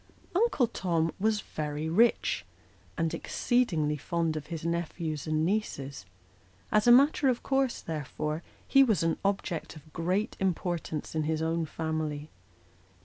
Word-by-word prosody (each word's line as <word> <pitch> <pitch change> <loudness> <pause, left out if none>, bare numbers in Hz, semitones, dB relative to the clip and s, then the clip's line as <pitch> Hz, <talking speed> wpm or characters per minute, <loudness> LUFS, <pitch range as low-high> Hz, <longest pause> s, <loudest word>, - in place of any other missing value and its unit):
Uncle 370 - +3
Tom 170 -7 0
was 215 0 +2
very 150 -2 -4
rich, 225 +9 +3 0.5
and 165 -1 0
exceedingly 165 -12 +1
fond 165 +2 -1
of 150 -1 -5
his 165 -1 -5
nephews 170 -3 -2
and 155 0 +1
nieces: 140 - -2 0.6
as 215 +2 +3
a - - +9
matter 275 +2 +6
of 245 - 0
course, 270 -2 +1
therefore, 155 0 -3 0.3
ho 275 0 +9
was 215 -8 +2
an 165 0 +1
object 195 -5 -2
of 155 0 -15
great 185 +6 0
importance 175 -4 -2
in 155 -1 0
his 160 0 0
own 165 0 0
family. 155 -1 -3
165 Hz, 140 wpm, -29 LUFS, 155-210 Hz, 0.6 s, a